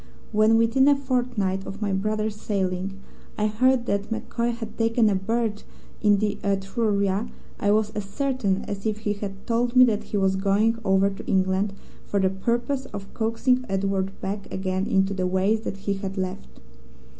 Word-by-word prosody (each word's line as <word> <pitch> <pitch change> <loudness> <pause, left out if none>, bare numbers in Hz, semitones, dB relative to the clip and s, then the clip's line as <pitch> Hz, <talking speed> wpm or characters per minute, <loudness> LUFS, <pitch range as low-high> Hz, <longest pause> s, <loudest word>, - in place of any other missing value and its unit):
When, 215 +1 +4
within 230 +4 +4
a 290 - +6
fortnight 245 -8 -1
of 195 - -7
my 205 -2 -1
brother's 215 +2 -1
sailing, 195 -2 -2 0.4
I 210 - +1
heard 245 +3 +2
that 200 -2 -1
MacCoy 235 +1 -1
had 230 -2 -7
taken 225 -1 +3
a - - +2
berth 220 +2 -1 0.4
in 205 -2 +5
the 210 0 -1
Etruria, 200 +1 0 0.3
I 205 - +1
was 215 0 +2
as 210 -2 -4
certain 210 -3 -1
as 200 +1 -4
if 215 0 -2
he 205 - +2
had 200 -1 -7
told 240 +1 0
me 255 - +9
that 215 -3 0
he 210 - -2
was 190 -1 +2
going 210 +4 +2
over 195 0 +3
to 195 - -9
England 190 +1 +1 0.3
for 200 - 0
the 190 -1 +2
purpose 240 +7 -1
of 195 -4 -8
coaxing 240 +3 +1
Edward 195 0 -1
back 200 +1 -4
again 190 0 -1
into 195 0 +2
the 185 -1 -1
ways 190 +4 +1
that 200 - -4
he 200 - +1
had 195 0 -5
left. 185 +1 -5
205 Hz, 180 wpm, -25 LUFS, 195-225 Hz, 0.4 s, me